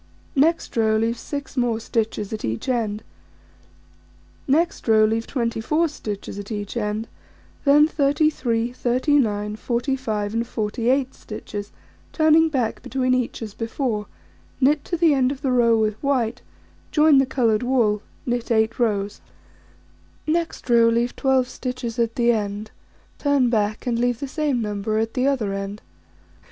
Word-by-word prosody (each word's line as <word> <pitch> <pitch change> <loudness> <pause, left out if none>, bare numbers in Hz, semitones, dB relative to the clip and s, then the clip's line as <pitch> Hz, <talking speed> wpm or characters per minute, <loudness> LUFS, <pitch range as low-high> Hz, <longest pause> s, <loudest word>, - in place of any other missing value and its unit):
Next 325 +4 +2
row: 220 -1 +3
Leave 225 +1 +1
6 285 -2 -6
more 240 -3 +1
stitches 220 -2 -2
at 215 - -5
each 110 - -3
end. 220 -4 -1 1.4
Next 320 +3 +1
row: 220 -1 +5
Leave 225 +1 -1
24 250 +6 0
stitches 205 -8 -6
at 205 +2 -8
each 205 0 -4
end, 215 0 -2 0.6
then 295 +2 +6
33, 275 -6 +1
39, 240 -5 +1
45, 235 -4 -2
and 230 +1 -1
48 245 +4 0
stitches, 205 -1 -7 0.4
turning 315 0 +4
back 255 -7 -1
between 255 -1 0
each 250 -2 -1
as 215 -2 -7
before, 225 -2 -2 0.5
knit 285 +2 +3
to 345 - -2
the 325 -2 +4
end 260 -2 +2
of 280 +1 -7
the 265 - +1
row 235 -2 +4
with 215 -1 0
white, 255 -5 0 0.5
join 300 -4 +5
the 270 - +2
coloured 230 -5 +1
wool, 235 -5 +2 0.2
knit 240 -1 -2
8 225 0 +1
rows. 205 -3 0 1.0
Next 330 -1 -1
row: 235 -1 +5
Leave 235 +1 0
12 265 -2 +2
stitches 250 -2 -5
at 230 -1 0
the 240 -1 +3
end, 210 -1 -3 0.5
turn 280 -4 +2
back, 215 0 0
and 235 -2 0
leave 245 -1 +1
the 280 - -4
same 285 -4 -1
number 210 +1 -2
at 225 0 -1
the 255 +1 +1
other 235 -8 0
end. 195 +1 -5
235 Hz, 145 wpm, -23 LUFS, 220-270 Hz, 1.4 s, then